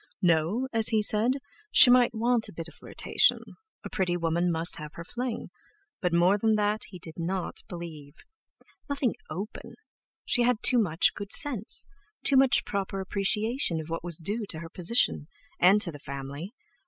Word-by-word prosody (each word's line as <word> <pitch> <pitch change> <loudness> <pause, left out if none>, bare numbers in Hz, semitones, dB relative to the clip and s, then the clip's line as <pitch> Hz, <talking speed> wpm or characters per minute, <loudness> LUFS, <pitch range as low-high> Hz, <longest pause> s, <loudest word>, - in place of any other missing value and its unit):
No—as 215 - +2
he 220 -2 +2
said—she 260 - +3
might 245 -1 +4
want 235 +1 +1
a - - -12
bit 165 0 -7
of - - -14
flirtation—a 440 -3 -1
pretty 180 -3 0
woman 170 +1 0
must 165 +3 +1
have 150 -2 -8
her 170 - -7
fling; 240 +5 -5 0.5
but 180 -3 0
more 175 +4 +3
than 220 +1 +2
that 210 0 +1
he 190 - -10
did 165 -1 -7
not 180 +2 -3
believe. 160 -4 -8 0.7
Nothing 280 -4 0 0.2
open; 195 +7 -7 0.5
she 245 - +2
had 240 -1 +1
too 250 - +6
much 175 -6 +2
good 205 -1 -7
sense, 250 -8 +1 0.4
too 280 - +3
much 260 -3 +4
proper 195 -1 -3
appreciation 200 - 0
of 160 0 -7
what 165 - -3
was 175 -3 -3
due 205 +6 -3
to 160 - -5
her 165 +1 -8
position, 180 -3 +1 0.3
and 190 +4 +6
to 170 - -2
the 145 - -11
family! 140 - -7
195 Hz, 165 wpm, -28 LUFS, 170-235 Hz, 0.7 s, too